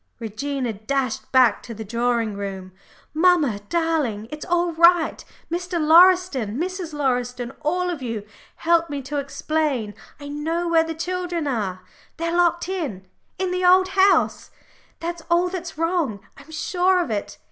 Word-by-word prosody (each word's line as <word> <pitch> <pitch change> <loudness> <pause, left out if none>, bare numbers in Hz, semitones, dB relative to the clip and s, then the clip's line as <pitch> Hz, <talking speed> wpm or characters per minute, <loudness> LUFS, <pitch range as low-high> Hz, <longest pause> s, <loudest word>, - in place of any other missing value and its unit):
Regina 245 +2 -3
dashed 250 +4 -3
back 255 -5 +4
to 230 - -9
the 220 +1 -7
drawing 235 0 0
room. 195 -2 -6 0.4
"Mamma 315 - +3
darling, 310 -11 0
it's 300 0 -6
all 350 -1 0
right. 340 0 +4 0.3
Mr. 350 0 -2
Lauriston, 325 - +5
Mrs. 360 +1 -3
Lauriston, 250 -4 -1
all 360 +4 0
of 325 -5 -5
you, 230 -4 -4 0.3
help 335 0 +2
me 285 -2 -4
to 290 +3 -4
explain. 280 -5 -1 0.3
I 285 - -8
know 320 +4 -2
where 330 -1 +4
the 325 0 -5
children 355 -1 -3
are 205 -9 -2 0.4
they're 335 +1 -2
locked 345 -1 +2
in, 300 - -4 0.3
in 375 0 -1
the 365 0 -1
Old 370 +1 +5
House 385 +1 +3 0.5
that's 340 0 -4
all 345 +1 +3
that's 350 -3 -6
wrong 330 - 0 0.2
I'm 280 +3 -16
sure 360 +3 +1
of 335 -10 -2
it. 205 -1 -4
315 Hz, 150 wpm, -23 LUFS, 245-350 Hz, 0.5 s, Lauriston